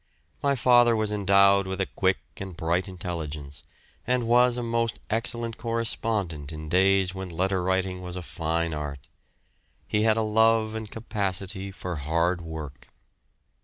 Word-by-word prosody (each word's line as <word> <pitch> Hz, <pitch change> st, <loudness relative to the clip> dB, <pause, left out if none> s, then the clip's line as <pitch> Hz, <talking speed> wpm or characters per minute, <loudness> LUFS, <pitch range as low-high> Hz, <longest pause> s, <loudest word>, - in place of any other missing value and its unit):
My 140 Hz, -1 st, +2 dB
father 120 Hz, -2 st, +5 dB
was 110 Hz, -1 st, 0 dB
endowed 100 Hz, -1 st, +4 dB
with 95 Hz, -1 st, -4 dB
a -, -, +2 dB
quick -, -, +1 dB, 0.2 s
and 95 Hz, -3 st, -7 dB
bright 85 Hz, +4 st, 0 dB
intelligence, 80 Hz, -6 st, -6 dB, 0.5 s
and 125 Hz, -1 st, +1 dB
was 125 Hz, +1 st, +4 dB
a 120 Hz, -, -2 dB
most 115 Hz, 0 st, 0 dB
excellent 115 Hz, 0 st, -1 dB
correspondent 110 Hz, -, -1 dB
in 80 Hz, -1 st, -7 dB
days 95 Hz, +1 st, +3 dB
when 95 Hz, -1 st, -6 dB
letter 95 Hz, +2 st, 0 dB
writing 95 Hz, 0 st, -1 dB
was 90 Hz, -1 st, -6 dB
a 90 Hz, -, -5 dB
fine 85 Hz, -1 st, -2 dB
art. 70 Hz, -3 st, -6 dB, 0.8 s
He 105 Hz, -, +1 dB
had 110 Hz, 0 st, +3 dB
a 110 Hz, -, +2 dB
love 110 Hz, 0 st, +3 dB
and 110 Hz, -1 st, -5 dB
capacity 100 Hz, -3 st, -3 dB
for 90 Hz, -3 st, -5 dB
hard 85 Hz, +5 st, 0 dB
work. 80 Hz, -4 st, -8 dB
95 Hz, 150 wpm, -26 LUFS, 85-110 Hz, 0.8 s, father